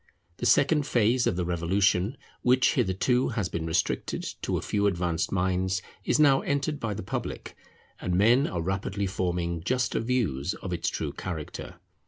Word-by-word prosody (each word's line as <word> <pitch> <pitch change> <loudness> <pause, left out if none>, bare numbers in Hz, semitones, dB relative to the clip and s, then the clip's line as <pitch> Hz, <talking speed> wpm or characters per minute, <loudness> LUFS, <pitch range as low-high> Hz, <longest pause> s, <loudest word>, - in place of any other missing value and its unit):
The 120 - 0
second 145 +3 +4
phase 120 0 +2
of - - +1
the 90 -1 -1
Revolution, 90 - +1 0.2
which 125 0 +4
hitherto 125 +7 +1
has 100 -5 0
been 80 -1 -3
restricted 80 - -1 0.2
to - - -1
a - - -3
few 100 -1 +1
advanced 85 -3 -1
minds, 95 0 0 0.2
is - - +2
now 140 -3 +5
entered 145 +1 -1
by 110 -3 -2
the 110 - -5
public, 95 - -5 0.4
and 90 - -1
men 115 +8 +4
are 85 -2 -3
rapidly 95 +2 -2
forming 90 -3 -2
juster 125 +7 0
views 110 - -1
of 95 - -5
its 85 - -1
true - - -3
character. 80 -5 -6
95 Hz, 165 wpm, -27 LUFS, 90-125 Hz, 0.4 s, now